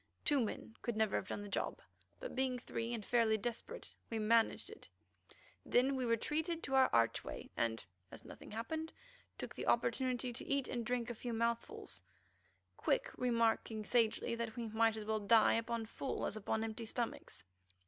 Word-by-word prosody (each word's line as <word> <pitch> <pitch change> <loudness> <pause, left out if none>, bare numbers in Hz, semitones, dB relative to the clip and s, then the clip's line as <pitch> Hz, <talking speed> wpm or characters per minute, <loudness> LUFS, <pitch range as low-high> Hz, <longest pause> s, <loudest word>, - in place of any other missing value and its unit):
Two 290 -2 +5
men 225 -1 -3
could 235 -3 -2
never 220 -2 +2
have 190 - -1
done 205 - -4
the - - -6
job, 200 - -2 0.4
but - - -6
being 260 -1 +1
three 235 -1 -3
and 225 -4 -3
fairly 230 -2 +4
desperate 240 - -4 0.2
we 225 - -2
managed 220 +1 +3
it. - - -11 0.7
Then 265 +3 +3
we 260 -1 0
retreated 310 +9 0
to 270 - -3
our 265 -1 +6
archway 115 - +1
and, 115 -3 0 0.3
as - - -9
nothing - - -10
happened, 315 +9 -3 0.4
took - - -5
the - - -5
opportunity 255 -2 +1
to - - -6
eat 280 -2 +1
and 240 -2 -2
drink 240 0 -1
a - - -3
few 240 +1 -4
mouthfuls, 230 +1 -2 0.8
Quick - - +1
remarking 230 -3 +1
sagely 230 -1 +2
that 230 -1 -3
we 235 -2 -3
might 220 0 +3
as 215 - -5
well 220 0 +1
die 215 +2 +6
upon 230 0 0
full 265 +4 -3
as - - -2
upon 220 +1 -1
empty 225 +1 -4
stomachs. 220 - -4
230 Hz, 175 wpm, -37 LUFS, 220-250 Hz, 0.8 s, our